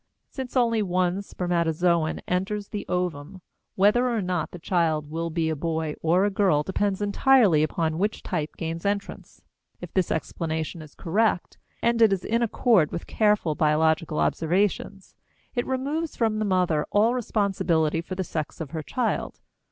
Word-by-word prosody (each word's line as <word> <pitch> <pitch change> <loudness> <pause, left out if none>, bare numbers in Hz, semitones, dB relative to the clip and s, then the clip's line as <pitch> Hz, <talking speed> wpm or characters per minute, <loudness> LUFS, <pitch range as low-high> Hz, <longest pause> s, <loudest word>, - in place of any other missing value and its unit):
Since 260 -1 -5
only 230 -3 +3
one 185 0 0
spermatozoon 170 -3 0
enters 200 +3 -2
the 205 - -5
ovum, 180 0 -3 0.4
whether 210 +6 +4
or 235 -2 0
not 180 -4 -2
the - - -9
child 160 -4 0
will 165 +1 -2
be 165 0 -1
a 160 - 0
boy 160 0 -2
or 175 +4 +3
a 205 - +1
girl 190 -7 +2
depends 195 +3 -1
entirely 205 - +4
upon 160 +1 -1
which 210 +3 -1
type 155 0 -3
gains 165 0 -4
entrance. 200 0 -4 0.4
If - - -9
this 185 -3 +1
explanation 160 0 -3
is 155 -2 -13
correct, 195 +1 0 0.2
and 235 0 +2
it 220 -3 +6
is 190 -2 -1
in 230 +2 +1
accord 225 - +3
with 170 - -5
careful 210 -7 +2
biological 155 +1 +1
observations, 190 +3 0 0.4
it 245 - -2
removes 285 +5 -2
from 220 -2 0
the 215 - 0
mother 180 -6 +1
all 220 +4 +3
responsibility 190 -9 0
for 185 +2 -6
the 190 - -2
sex 155 -4 -5
of 155 -4 -6
her 160 -1 -3
child. 230 - -2
180 Hz, 160 wpm, -25 LUFS, 160-210 Hz, 0.4 s, it